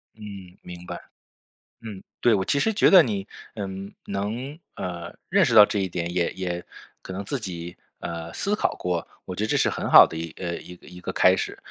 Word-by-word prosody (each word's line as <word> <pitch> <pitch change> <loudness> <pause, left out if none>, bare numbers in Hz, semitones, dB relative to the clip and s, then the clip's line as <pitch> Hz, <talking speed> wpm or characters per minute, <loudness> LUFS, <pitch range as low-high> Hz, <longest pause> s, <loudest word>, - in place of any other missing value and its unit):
嗯， 100 -4 -10
明 90 0 -10
白。 - - -6 0.8
嗯， 105 -4 -8 0.2
对， 120 - +4
我 95 -2 +1
其 140 - +1
实 220 +10 +2
觉 210 - +5
得 185 -3 +9
你， 100 -8 -3 0.3
呃， 105 - -4 0.4
能， 115 +9 -4 0.2
呃， 85 -2 -6
认 195 0 +4
识 125 -6 +1
到 105 -2 +11
这 105 - -2
一 95 -1 0
点， 85 0 -3
也 90 -1 +1
也 90 -2 -4 0.4
可 95 - -8
能 100 +2 -5
自 140 +7 -1
己， 90 -5 -6 0.2
呃， 85 0 -5
思 205 +1 0
考 - - 0
过， 90 -2 -2 0.2
我 90 - -6
觉 105 - -1
得 - - -2
这 - - +2
是 - - +3
很 - - -3
好 - - +10
的 - - -5
一 80 0 -5
呃， 85 -2 -3
一 90 - -11
个 90 - -19
一 90 0 -11
个 - - -4
开 - - +5
始。 - - -3
95 Hz, 235 characters per minute, -25 LUFS, 90-110 Hz, 0.8 s, 到